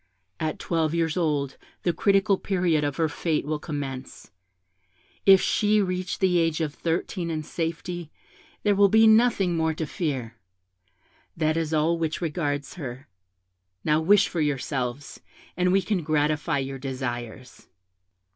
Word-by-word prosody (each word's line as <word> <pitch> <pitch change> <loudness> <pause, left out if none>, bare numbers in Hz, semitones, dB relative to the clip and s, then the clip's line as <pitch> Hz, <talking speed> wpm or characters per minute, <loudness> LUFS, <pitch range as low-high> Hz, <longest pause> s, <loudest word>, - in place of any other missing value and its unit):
At 155 -1 -2
twelve 165 -1 -1
years 165 -1 0
old 150 -6 -1 0.3
the 175 - +1
critical 195 +3 +3
period 175 -6 +1
of 145 -1 -1
her 165 - +2
fate 150 +1 -1
will 150 0 -2
commence; 140 -4 -6 1.0
if 195 -1 +9
she 210 +3 +2
reach 185 -1 -1
the 180 -2 +2
age 165 -1 +1
of 155 -3 -2
thirteen 170 +2 -2
in 155 -1 -2
safety, 165 +1 -4 0.5
there 210 - +3
will 200 0 +5
be 220 +2 +6
nothing 220 -5 +4
more 160 -1 0
to 160 - -3
fear. 130 -8 -3 1.0
That 155 -1 +1
is 165 -1 -1
all 160 +2 +2
which 160 -1 -1
regards 145 -4 -2
her. 130 0 -7 0.8
Now 155 0 +2
wish 195 +4 +5
for 170 - -2
yourselves, 135 -2 -2 0.4
and 180 0 +2
we 195 0 +3
can 195 -2 0
gratify 150 -1 0
your 135 0 -4
desires.' 125 -2 -6
160 Hz, 145 wpm, -25 LUFS, 145-180 Hz, 1.0 s, if